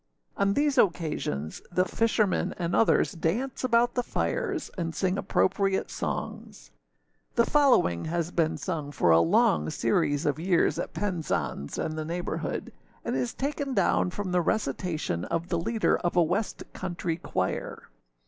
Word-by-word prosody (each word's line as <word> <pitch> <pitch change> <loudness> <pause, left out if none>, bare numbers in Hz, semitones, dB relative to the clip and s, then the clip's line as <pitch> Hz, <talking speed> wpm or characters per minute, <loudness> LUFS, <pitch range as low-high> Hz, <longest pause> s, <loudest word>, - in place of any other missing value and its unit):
On 200 0 +1
these 290 -2 +2
occasions 150 - 0
the 185 +1 +2
fishermen 215 -4 +1
and 170 -1 -1
others 225 - +3
dance 205 +12 -2
about 240 -1 +3
the 250 - +1
fires, 395 - -2
and 165 -3 -3
sing 190 -1 +1
appropriate 195 0 +1
songs. - - -5 0.6
The 235 - +4
following 250 - +3
has 170 +1 -2
been 165 -3 +1
sung 155 -6 -4
for 85 -11 +2
a 80 - +7
long 80 -2 +3
series 140 - +1
of 145 +1 0
years 175 +1 +2
at - - -4
Penzance 170 - -2
and 155 - -2
the - - -2
neighbourhood, 170 +3 -4 0.3
and - - -1
is 125 -2 -2
taken 280 -1 -2
down - - +2
from 190 0 -4
the 180 0 +3
recitation 160 - -1
of 170 +1 -2
the 170 - 0
leader 220 +6 +1
of 175 - -2
a 175 - +6
West 190 +7 -2
country 175 -2 -3
choir. 95 - -3
175 Hz, 150 wpm, -27 LUFS, 155-215 Hz, 0.6 s, a